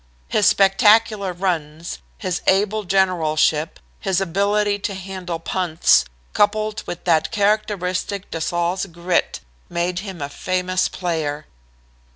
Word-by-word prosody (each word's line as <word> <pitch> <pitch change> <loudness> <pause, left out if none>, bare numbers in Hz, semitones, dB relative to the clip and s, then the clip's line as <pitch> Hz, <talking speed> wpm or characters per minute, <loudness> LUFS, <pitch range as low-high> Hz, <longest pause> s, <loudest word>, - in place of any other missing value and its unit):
His 210 - +3
spectacular 205 0 +4
runs, 170 -3 -3 0.2
his 185 -4 -3
able 205 +2 +2
generalship, 165 -4 +1 0.2
his 190 -1 0
ability 200 +3 +1
to 200 0 -3
handle 185 -2 -5
punts, 165 0 +2 0.3
coupled 215 +1 +1
with 175 - -6
that 160 -3 +2
characteristic 200 -3 -1
de 165 - -4
Saulles' 175 +3 -1
grit, 170 - -1 0.3
made 175 +1 -1
him 190 -3 -7
a 140 - -3
famous 185 +4 -1
player. 155 -5 -3
185 Hz, 115 wpm, -21 LUFS, 170-200 Hz, 0.3 s, spectacular